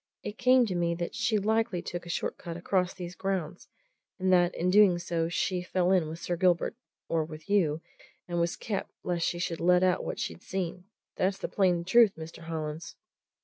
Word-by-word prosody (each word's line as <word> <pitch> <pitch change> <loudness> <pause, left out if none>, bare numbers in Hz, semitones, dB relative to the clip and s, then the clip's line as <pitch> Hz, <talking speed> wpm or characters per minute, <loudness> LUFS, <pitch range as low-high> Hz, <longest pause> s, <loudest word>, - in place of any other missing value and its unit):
"It 210 - -6
came 255 0 +5
to 200 - -3
me 170 -1 0
that 170 0 -4
she 230 -1 +1
likely 215 -3 0
took 175 0 -6
a - - -8
short - - -2
cut 170 -2 -6
across 180 +1 0
these 180 -2 -7
grounds, 185 -4 -3 0.5
and 185 -1 +2
that 175 0 +4
in 180 +2 +1
doing 200 -3 +6
so 170 -1 -1
she 180 +1 0
fell 180 0 0
in 180 -5 +3
with 160 - -6
Sir 175 +1 -2
Gilbert 175 +3 +2 0.3
or 165 -1 +1
with 155 0 -10
you 165 -7 +2 0.5
and 175 -1 -2
was 170 0 0
kept, 205 -3 -4
lest 175 -2 0
she 175 - -1
should 170 -1 -2
let 180 +1 +4
out 185 -1 +2
what - - -4
she'd - - -4
seen. 180 -1 -4 0.3
That's 190 +1 +1
the - - -4
plain 180 -4 +2
truth, 220 +1 +5
Mr. 160 0 -9
Hollins." 160 0 -5
180 Hz, 200 wpm, -29 LUFS, 170-190 Hz, 0.5 s, doing